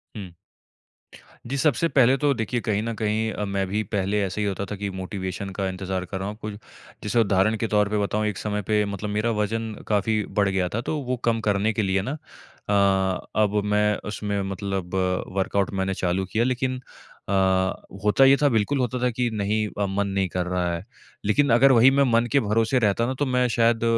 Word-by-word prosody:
हुँ। 100 -4 -7 1.2
जी, 140 - -2
सबसे 150 +4 +2
पहले 130 -3 +4
तो 145 +1 +2
देखिए 120 +1 -2
कहीं 105 -2 0
न 115 - -3
कहीं 110 +1 0
अ, 105 - -3
मैं 100 0 -1
भी 105 +3 -1
पहले 100 +1 -1
ऐसे 95 +2 -3
ही 105 - 0
होता 100 0 -2
था - - -2
कि 100 0 -4
मोटिवेशन 95 0 -5
का 100 -1 -1
इंतज़ार 95 0 -4
कर 95 +2 -5
रहा 95 - -3
हूँ, 105 - -5
कुछ 105 -1 -5 0.5
जैसे 105 +3 +1
उदाहरण 100 0 +3
के 115 - -1
तौर 105 -1 +2
पे 105 - 0
बताऊँ। 105 +1 0
एक 105 -4 -3
समय 105 -1 -2
पे 105 -1 +2
मतलब 100 +1 -4
मेरा 105 +3 0
वज़न 110 +1 -2
काफ़ी 105 +1 +1 0.2
बढ़ 100 -1 +3
गया 95 -2 0
था 115 - 0
तो 150 +5 -3
वो 130 -1 -2
कम 115 -1 +2
करने 100 +2 +1
के 110 - 0
लिए 95 -1 +1
ना 135 +10 -4 0.5
अ, 95 -2 +2 0.2
अब 105 0 +1
मैं 105 0 +2
उसमें 105 -1 -2
मतलब 95 -2 -4 0.4
वर्कआउट 95 0 0
मैंने 95 0 -1
चालू 95 +1 -1
किया 115 - +2
लेकिन 130 +1 -1 0.5
अ, - - -1 0.7
होता 105 +6 +5
ये 135 +1 +7
था, 145 - +5
बिल्कुल 115 +4 +1
होता 125 0 -1
था 125 - +2
कि 120 +1 -1
नहीं 105 +1 0 0.2
अ, - - +2
मन 100 +1 -1
नहीं 95 -1 0
कर 90 0 -2
रहा 90 -1 -1
है। 85 +2 -4 0.4
लेकिन 140 +8 +3
अगर 135 +3 +6
वही 125 +2 +6
मैं 140 +1 +3
मन 115 +1 +3
के 140 - +4
भरोसे 115 +2 +1
रहता 110 0 +2
ना 130 - -1
तो 145 - +2
मैं 125 -1 +2
शायद 115 -1 +2
105 Hz, 215 wpm, -24 LUFS, 100-115 Hz, 1.2 s, ये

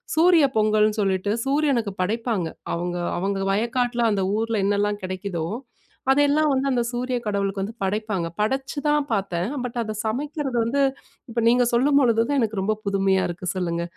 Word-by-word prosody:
சூரிய 330 -1 +6
பொங்கல்னு 215 0 +3
சொல்லிட்டு, 195 0 0
சூரியனுக்கு 270 -6 +1
படைப்பாங்க. 220 -2 -1 0.3
அவங்க 175 +1 -2 0.2
அவங்க 195 +1 -1
வயக்காட்டில 240 +3 0
அந்த 195 -2 0
ஊருல 225 -2 0
என்னெல்லாம் 205 0 0
கெடைக்குதோ, 185 -3 -3 0.7
அதெல்லாம் 290 +2 +3
வந்து 265 +1 0
அந்த 245 -2 +1
சூரிய 250 +1 -2
கடவுளுக்கு 200 -1 -1
வந்து 220 +4 -6
படைப்பாங்க. 205 -3 -1
படைச்சுதான் 285 +5 0
பாத்தேன். 190 -2 -1 0.2
பட் 245 - -6
அத 215 0 -5
சமைக்கிறது 275 +3 -2
வந்து 280 +4 +1 0.5
இப்போ 230 0 -1
நீங்க 245 +1 +4
சொல்லும்பொழுது 250 -2 +4
தான், 285 -1 +2
எனக்கு 215 -3 -1
ரொம்ப 215 +3 +1
புதுமையா 195 -1 +2
இருக்கு 175 +1 -6
சொல்லுங்க. 170 -2 -1
220 Hz, 145 wpm, -23 LUFS, 195-255 Hz, 0.7 s, சூரிய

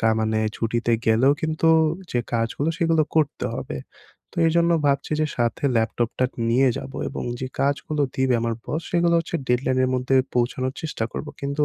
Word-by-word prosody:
কা 115 - +3
মানে 110 0 +1 0.2
ছুটিতে 115 +1 0
গেলেও 115 +5 +5
কিন্তু 160 +1 +1 0.4
যে 120 - +1
কাজগুলো 115 +6 0
সেগুলো 165 -2 +3
করতে 155 -3 +1
হবে। 65 - -5 0.6
তো - - -6
এজন্য 170 +1 +3 0.2
ভাবছি 140 +2 +1
যে - - +2
সাথে 120 +3 -1
ল্যাপটপটা 115 +2 0 0.3
নিয়ে 130 +3 +4
যাবো, 135 - -8
এবং - - -5 0.2
যে 130 - -2
কাজগুলো 145 +2 0
দিবে 130 -1 +2
আমার 115 0 -1
বস 160 +3 -2
সেগুলো 170 -1 +3
হচ্ছে 170 +1 -2
ডেডলাইনের 130 +1 +2
মধ্যে 130 +1 +1 0.2
পৌঁছানোর 125 +2 0
চেষ্টা 155 -8 -3
করবো। 150 - -5
কিন্তু 140 +1 0
130 Hz, 165 wpm, -23 LUFS, 120-155 Hz, 0.6 s, গেলেও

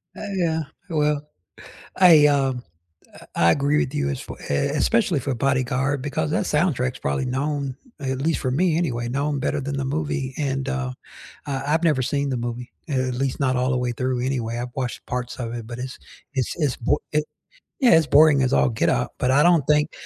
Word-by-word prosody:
Ah, - - -8
yeah, 165 -3 +1 0.3
well, 150 -2 +1 0.8
I, 165 -5 +7
um, 135 -3 +1 0.5
a - - -14
I 85 0 +5
agree 145 - +2
with 130 - 0
you 70 -1 0
as 70 - -3
f - - -9
e - - -7
es 140 - 0
especially 190 -2 +2
for 135 +1 -2
Bodyguard 130 +2 0
because 145 +2 -2
that - - 0
soundtrack 145 -6 +1
is - - -12
probably 70 - -1
known, 135 +1 -2 0.2
at 130 -2 -2
least 160 +3 0
for 130 - -1
me 165 +4 +2
anyway, 120 -9 -1
known 140 +3 -1
better 145 - -1
than 140 +1 -3
the 135 - -2
movie 135 -2 -2
and, 135 -2 -1
uh, 130 -2 -2 0.6
I 135 -2 -2
I've 165 +2 +2
never 150 -6 +3
seen 140 +2 -1
the 130 - -1
movie, 120 0 -5 0.2
a - - -1 0.2
at - - -3
least 135 +2 -2
not 130 -2 +2
all 125 +1 +1
the 130 - +1
way 125 -1 -1
through 125 +1 -1
anyway, 120 -3 -2
I've 120 0 -5
watched 125 -3 -4
parts 125 0 -4
of 120 -2 -4
it, 115 -2 -6
but 120 +1 -7
it's 125 +1 -6 0.4
it's 130 -3 -1
it's 150 -6 0
bo 125 +5 0
it 150 0 +1 0.6
yeah, 250 - +6
it's 160 -3 +2
boring 150 -1 +6
as 130 - +1
all - - +4
get 110 - +1
up, - - 0
but 125 - +1
I 140 +3 +5
don't 170 -4 +5
think 150 0 +3
135 Hz, 215 wpm, -23 LUFS, 125-150 Hz, 0.8 s, I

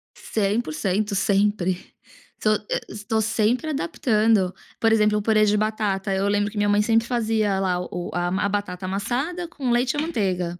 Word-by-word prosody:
100% 200 -1 -1
sempre, 195 -2 +1 0.6
estou 215 0 +2 0.2
eh, - - 0
estou 220 +1 -2
sempre 225 +7 +1
adaptando, 225 - +1 0.3
por 225 -1 +3
exemplo, 210 -1 +3
o - - 0
purê 215 0 +3
de 210 0 +2
batata, 210 -2 -1
eu 190 +1 0
lembro 205 0 +1
que 215 - -9
minha 205 0 +2
mãe 205 0 +4
sempre 225 +2 +2
fazia 220 -5 0
lá 185 -2 0
o 180 0 -5
a 175 +4 0
batata 195 -2 -3
amassada 255 - -2
com 285 -7 -4
leite 245 +2 +2
e - - -4
a 295 - +1
manteiga. 185 - -2
210 Hz, 170 wpm, -23 LUFS, 195-225 Hz, 0.6 s, mãe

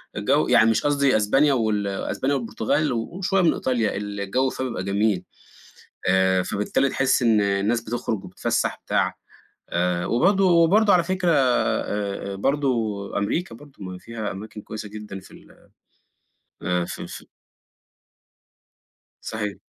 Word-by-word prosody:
الجَو 135 +9 +2
يعني 115 -2 +5
مش 115 - +1
قصدي 140 -4 +3
أسبانيا 135 +7 +3
وال 110 -4 0
أسبانيا 130 +8 -1
والبرتغال 130 +4 0
وشوية 185 - -1
من 170 - +4
إيطاليا، 120 -4 0
الجَو 105 +5 -1
فيها 130 - -4
بيبقى 120 -7 -4
جميل. 100 -1 +1 0.9
آآ 95 0 +3
فبالتالي 105 +8 0
تحِس 135 -1 +1
إن 115 -3 +4
الناس 100 +3 +1
بتخرُج 115 -2 -3
وبتتفسّح 90 - -1
وبتاع. - - 0 0.6
آآ 85 0 0
وبرضه 190 - +3
وبرضه 185 +5 +5
على 175 -2 +4
فكرة 185 0 0
آآ 110 -7 0
برضه 140 +7 0 0.5
أمريكا 115 - -2
برضه، 145 +4 -14
ما 90 0 -7
فيها 110 +1 -5
أماكن 105 +2 -8
كويسة 110 0 -7
جدًا 105 -2 -8
في - - -17
ال - - -16 1.1
آآ 90 -1 0
في - - -6
في - - -10 2.0
صحيح. 105 -2 -4
110 Hz, 130 wpm, -23 LUFS, 100-140 Hz, 2.0 s, يعني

